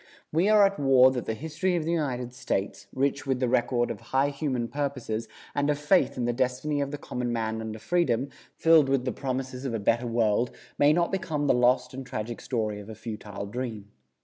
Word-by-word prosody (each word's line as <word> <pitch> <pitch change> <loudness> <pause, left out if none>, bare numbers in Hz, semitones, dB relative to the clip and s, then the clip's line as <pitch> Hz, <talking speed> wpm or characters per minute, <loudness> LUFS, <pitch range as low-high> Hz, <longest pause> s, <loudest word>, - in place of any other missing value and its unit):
We 170 +6 +2
are 210 -1 +7
at 195 -3 0
war 130 -2 +6
that 125 -3 -3
the 110 - -2
history 160 +6 -1
of 165 -3 -1
the 165 - 0
United 125 -7 -2
States, 125 -5 -3
rich 140 +1 -1
with 130 -2 +1
the 125 - +1
record 120 0 +1
of 105 - -7
high 135 +2 +1
human 140 -4 -2
purposes, 130 -6 -3 0.3
and 145 +1 0
of 145 - +2
faith 150 +3 +2
in 120 - 0
the 120 - +1
destiny 130 +4 0
of 140 - -1
the 145 - -5
common 125 -3 -3
man 110 -1 -2
under 110 -1 -5
freedom, 140 -3 0 0.3
filled 160 -4 +5
with 135 -2 +1
the 130 - 0
promises 130 +1 -4
of 130 -4 -2
a - - -1
better 115 +4 +1
world, 115 0 +2 0.3
may 145 +1 +6
not 170 +2 +2
become 170 -6 -1
the - - +4
lost 125 +1 +2
and 135 +1 -6
tragic 120 -2 -5
story 110 -4 -2
of 105 +1 -10
a 110 - -7
futile 105 -2 -6
dream. 110 -2 -5
130 Hz, 215 wpm, -27 LUFS, 115-145 Hz, 0.3 s, are